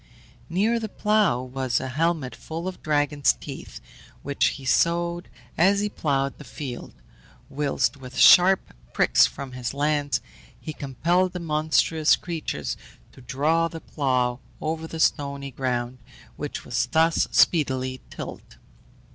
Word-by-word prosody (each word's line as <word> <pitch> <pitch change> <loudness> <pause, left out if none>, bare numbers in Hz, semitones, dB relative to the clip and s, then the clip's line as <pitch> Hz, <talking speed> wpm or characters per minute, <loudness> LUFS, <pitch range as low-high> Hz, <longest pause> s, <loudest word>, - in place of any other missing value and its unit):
Near 210 +7 +1
the 220 -1 -4
plough 210 - +2
was 130 0 -1
a 130 - -4
helmet 155 -1 -1
full 165 +3 -6
of 185 - -6
dragon's 145 -3 +2
teeth, - - -9 0.4
which 140 0 0
he 135 - -11
sowed 170 +5 +1 0.3
as 195 +4 +4
he 210 0 0
ploughed 140 -7 -1
the - - -9
field, 130 -1 -7 0.6
whilst 140 -2 0
with 130 -2 -10
sharp 185 +2 +6 0.2
pricks - - +5
from 135 -2 -8
his 125 +1 -5
lance 145 -2 +1 0.4
he 155 - -6
compelled 170 +7 0
the 180 - -4
monstrous 155 0 +2
creatures 115 - -4 0.3
to - - -16
draw 155 +7 +1
the 165 0 -8
plough 125 -5 -1 0.2
over 160 +1 -3
the 160 - -7
stony 140 -3 0
ground, 125 -1 -2 0.4
which - - -6
was - - 0
thus 165 +1 +3
speedily 130 -5 +2
tilled. - - -9
150 Hz, 135 wpm, -25 LUFS, 130-165 Hz, 0.6 s, sharp